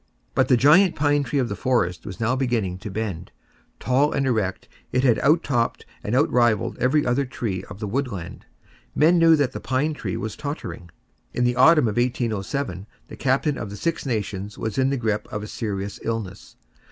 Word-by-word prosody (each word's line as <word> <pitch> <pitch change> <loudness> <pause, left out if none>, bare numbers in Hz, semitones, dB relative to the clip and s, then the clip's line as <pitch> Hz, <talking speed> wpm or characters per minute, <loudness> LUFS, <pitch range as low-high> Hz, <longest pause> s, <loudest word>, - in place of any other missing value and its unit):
But 130 - +2
the 125 - +4
giant 170 +8 +5
pine 145 0 +2
tree 135 +2 -2
of 130 -3 +1
the - - -4
forest 90 -9 0
was 95 - -7
now 115 +3 +1
beginning 115 -9 -1
to 105 - -7
bend. 100 -4 -4 0.5
Tall 135 +4 +2
and 140 - 0
erect, 110 -7 -1 0.2
it 125 - +1
had 120 -4 +4
out 155 +5 +3
topped 120 -4 -1 0.2
and 105 - -1
outrivalled 120 -6 +2
every 145 +4 +2
other 125 +3 +1
tree 110 -8 -4
of - - -10
the 105 - -3
woodland. 105 -7 -4 0.5
Men 170 +3 +4
knew 165 -1 +6
that 145 -4 +1
that - - -6
pine 140 +4 0
tree 95 -11 -4
was 110 - -4
tottering. 145 - -6 0.5
In 125 - +1
the 125 0 +2
autumn 150 +1 +6
of 105 - -2
1807 115 - -2 0.2
the - - -8
Captain 135 +2 0
of 105 - -5
the 105 - -8
Six 165 +10 -2
Nations 105 -5 -3
was 110 +2 -3
in 130 0 +3
the 140 - 0
grip 110 -3 -1
of 105 0 -4
a - - -6
serious 100 -3 -4
illness. 110 -4 -5
120 Hz, 195 wpm, -23 LUFS, 105-140 Hz, 0.5 s, knew